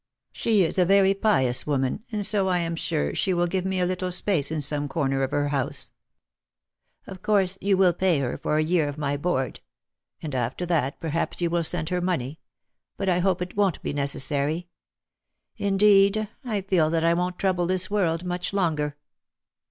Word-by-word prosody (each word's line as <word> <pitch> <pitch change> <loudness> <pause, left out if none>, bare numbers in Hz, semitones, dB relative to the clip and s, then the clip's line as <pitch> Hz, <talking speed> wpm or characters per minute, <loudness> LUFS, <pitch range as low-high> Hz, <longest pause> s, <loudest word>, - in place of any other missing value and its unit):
She 215 -4 +2
is 175 +3 -1
a - - +6
very 195 +1 +4
pious 135 - +1
woman 135 +6 -1
and 210 -2 +1
so 200 -1 +4
I 180 -1 +1
am 170 -1 -2
sure 75 - -2
she 190 -2 0
will 175 0 +2
give 185 +1 -2
me 190 -1 -1
a 180 - +2
little 185 0 -2
space 180 -5 +1
in 160 0 -2
some 145 0 +1
corner 135 -2 -1
of 135 - 0
her 145 0 -1
house. 140 -3 -1 1.1
Of 190 -1 -10
course 195 -3 +1
you 195 -1 +2
will 185 -2 +4
pay 180 -1 +1
her 135 -3 -2
for 150 - -1
a 155 - +2
year 160 -1 +1
of 145 0 -6
my 145 -1 -1
board. 145 -4 -2 0.6
And 150 -3 -6
after 130 +7 -2
that 155 -6 -1
perhaps 165 +1 -2
you 170 -1 0
will 170 0 +1
send 160 -1 +1
her 180 -1 -1
money. 160 -5 -2 0.6
But 195 - -1
I 180 -1 +2
hope 180 -1 +1
it 180 - -9
won't 200 -4 +1
be - - -3
necessary. 145 +3 0 0.9
Indeed, 200 +1 +3 0.2
I 215 -5 -2
feel 185 -5 +1
that 165 0 0
I 165 0 +3
won't 180 +1 -2
trouble 180 -3 0
this 185 +1 0
world 175 -5 0
much 180 +1 -3
longer." 150 -6 -1
175 Hz, 190 wpm, -25 LUFS, 150-190 Hz, 1.1 s, a